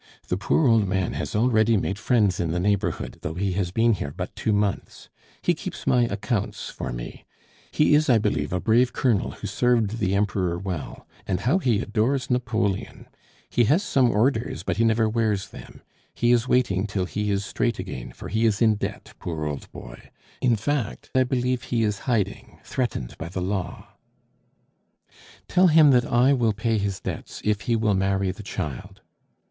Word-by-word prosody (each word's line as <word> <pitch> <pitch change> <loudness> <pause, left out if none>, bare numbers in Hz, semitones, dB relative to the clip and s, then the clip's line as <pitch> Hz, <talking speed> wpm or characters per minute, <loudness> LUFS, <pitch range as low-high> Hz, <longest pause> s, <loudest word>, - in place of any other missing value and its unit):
The - - +1
poor 130 - +2
old 115 -4 +4
man 95 -3 -1
has 75 +5 -4
already 110 -1 +3
made 95 +1 -2
friends 110 -5 +2
in 85 - 0
the 85 +2 -1
neighborhood, 100 +2 -1
though 80 - -4
he 95 +1 -1
has 90 -1 -1
been 115 +5 +3
here 80 -8 -3
but - - -5
two 110 - -1
months. 105 -2 -2 0.3
He - - +3
keeps - - -7
my 120 -1 +3
accounts 105 0 -3
for - - -5
me. - - -7 0.5
He 150 - +3
is, 150 0 +4
I 120 - +6
believe, 100 -9 -1
a 90 - 0
brave 120 +5 +3
Colonel 115 -7 +1
who - - -9
served 115 -3 +1
the 95 -1 +1
Emperor 95 -4 0
well. 90 -5 -6 0.2
And 90 -2 -1
how 145 +11 +2
he 120 - +1
adores 125 +4 0
Napoleon! 110 -6 -1 0.4
He 120 - +2
has 155 - +3
some 130 -10 +3
orders, 110 - 0
but - - -2
he 115 - +3
never 115 0 +3
wears 110 -3 0
them. - - -13 0.3
He 120 - +2
is 120 0 +3
waiting 110 -7 +1
till 100 -2 -2
he 105 +2 -3
is 100 0 0
straight 120 +3 -1
again, - - -6
for - - -9
he 110 +3 +2
is 105 -2 0
in 110 -3 +4
debt, - - -6
poor 80 -3 -4
old 75 -2 -5
boy! - - -11 0.3
In 125 -2 +3
fact, 110 - -3
I 130 - +4
believe 125 0 -1
he 115 -2 0
is 105 -2 -1
hiding, 105 -5 -2
threatened 120 - -3
by 80 - -5
the 95 - -4
law 95 0 -3 0.8
" - - -27
"Tell 185 +1 +4
him 155 -3 +6
that 125 -2 +4
I 125 +3 +3
will 120 -5 +2
pay 110 +1 0
his 100 -2 -2
debts - - -6
if 105 -1 +1
he 120 - 0
will 110 -2 +2
marry 95 0 +1
the 95 - -10
child." 85 -9 -6
105 Hz, 190 wpm, -24 LUFS, 95-120 Hz, 0.8 s, I